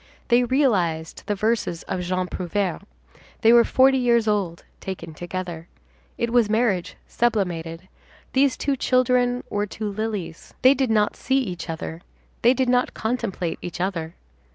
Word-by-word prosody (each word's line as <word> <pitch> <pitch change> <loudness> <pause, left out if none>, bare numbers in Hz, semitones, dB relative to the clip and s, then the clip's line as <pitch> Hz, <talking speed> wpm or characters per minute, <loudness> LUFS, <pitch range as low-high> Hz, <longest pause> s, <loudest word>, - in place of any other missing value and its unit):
They 240 0 +5
realized 190 - +1
the 205 - 0
verses 215 -5 -1
of 180 - -3
Jean 185 +1 -1
Prouvaire; 180 0 -2 0.6
they 225 +1 +6
were 235 0 +8
forty 265 +2 +4
years 235 -2 +3
old 195 -6 -1 0.2
taken 175 -4 -6
together. 175 0 -6 0.5
It 235 0 -1
was 235 -4 +4
marriage 215 -5 +1
sublimated; 180 -7 -1 0.5
these 265 -2 +3
two 280 -1 0
children 250 -1 +2
were 205 0 -1
two 210 0 -4
lilies. 205 -5 -5
They 260 +1 +8
did 270 -3 0
not 210 -2 +2
see 265 +1 0
each 180 -10 -3
other, 160 0 -5 0.4
they 245 +3 +5
did 260 0 +1
not 250 0 +1
contemplate 220 -7 -2
each 175 -1 -6
other. 170 -3 -3
210 Hz, 150 wpm, -23 LUFS, 175-245 Hz, 0.6 s, were